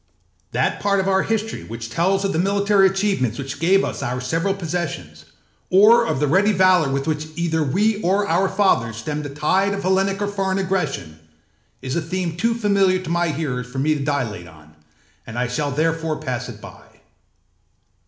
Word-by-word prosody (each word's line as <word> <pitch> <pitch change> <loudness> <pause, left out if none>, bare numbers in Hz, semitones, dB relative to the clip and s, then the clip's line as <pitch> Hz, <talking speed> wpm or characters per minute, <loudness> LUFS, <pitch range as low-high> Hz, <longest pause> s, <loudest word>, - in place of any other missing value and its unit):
That 125 - 0
part 200 -1 +1
of 190 - -1
our 190 0 +3
history 220 +1 -2
which 115 0 -7
tells 190 +7 +1
of 195 - -1
the 160 - 0
military 200 +1 +3
achievements 190 - 0
which 140 0 -6
gave 190 +5 +3
us - - -5
our 125 +1 -2
several 165 +9 -1
possessions, 160 - -5 0.4
or 225 +5 +6
of - - -1
the 150 - +2
ready 190 +9 +3
valour 185 -6 +4
with 135 0 -1
which 155 -1 -2
either 165 -1 0
we 205 +9 +1
or 200 +2 +1
our 190 +3 +2
fathers 190 - +1
stemmed 150 +6 -4
the - - -5
tide 185 +8 +1
of 200 - -5
Hellenic 195 +1 +1
or 205 - -1
foreign 195 -2 -1
aggression, 150 - -2 0.6
is 130 0 -3
a 170 - 0
theme 170 0 -3
too 230 +6 0
familiar 200 -4 +2
to 185 -3 -6
my 175 0 +1
hearers 140 -6 -3
for 125 +2 -9
me 150 +3 +2
to 145 -2 -3
dilate 125 - -2
on, 80 -1 -17 0.5
and 110 - -7
I 125 0 0
shall 145 +4 -2
therefore 160 +2 -1
pass 125 -4 -4
it 110 -3 -10
by. - - -12
170 Hz, 190 wpm, -21 LUFS, 135-195 Hz, 0.6 s, or